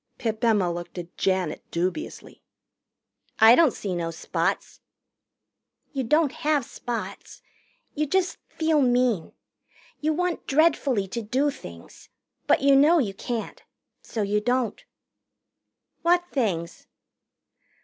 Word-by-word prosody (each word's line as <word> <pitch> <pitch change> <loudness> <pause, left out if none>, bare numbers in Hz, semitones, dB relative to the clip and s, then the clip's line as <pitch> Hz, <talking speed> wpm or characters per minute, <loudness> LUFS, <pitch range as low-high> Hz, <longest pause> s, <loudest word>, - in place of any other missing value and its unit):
Pip 225 0 -3
Emma 205 -7 +3
looked 175 +1 -8
at 175 0 -8
Janet 185 -5 -1
dubiously. 185 - -4 1.0
"I 225 +1 +8
don't 320 +3 +6
see 195 -4 -5
no 170 -1 -2
spots." 165 - -3 1.1
"You 270 -2 -1
don't 300 +4 +2
have 295 -4 0
spots. 240 -1 -7 0.5
You 300 +1 -1
just 375 +4 0
feel 315 -2 +1
mean. 245 -8 +1 0.7
You 310 +1 0
want 360 +1 -2
dreadfully 275 -8 +2
to 235 - -3
do 265 +7 0
things. 85 - -12 0.4
But - - +3
you 280 0 +6
know 300 +5 +6
you 225 -11 0
can't. 230 +3 -5 0.4
So 220 - -3
you 205 +1 0
don't." 245 -1 -1 1.2
"What 350 +1 +3
things?" 180 - -2
245 Hz, 120 wpm, -25 LUFS, 195-295 Hz, 1.2 s, I